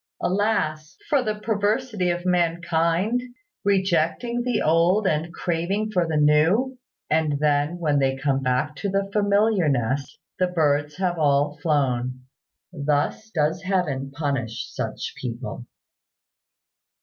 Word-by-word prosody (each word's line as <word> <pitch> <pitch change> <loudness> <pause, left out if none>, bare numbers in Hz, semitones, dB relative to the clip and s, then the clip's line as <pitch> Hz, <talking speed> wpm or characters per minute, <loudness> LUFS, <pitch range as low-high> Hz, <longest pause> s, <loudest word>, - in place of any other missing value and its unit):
Alas! 185 -5 -1
for 285 -3 +4
the 215 -4 -1
perversity 210 -1 0
of 175 +1 -2
mankind, 170 +4 +1 0.4
rejecting 195 +5 +1
the 245 -2 0
old 170 +6 +3
and 160 -1 0
craving 185 +6 -2
for 180 -4 +1
the 160 -1 0
new? 165 - +3 0.3
And 155 -2 +2
then 150 +3 +1
when 150 -4 +1
they 135 -1 +1
come 135 -1 0
back 125 +4 0
to 200 - -2
the 195 +1 -1
familiar 205 -3 +3
nest, 135 +1 -1 0.2
the 185 - +3
birds 150 -4 +1
have 180 -3 -1
all 145 0 +2
flown. 130 -5 0 0.5
Thus 145 +9 -1
does 160 -2 0
heaven 165 -8 -1
punish 135 -6 -3
such - - -4
people. 120 0 -6
165 Hz, 125 wpm, -24 LUFS, 145-195 Hz, 0.5 s, for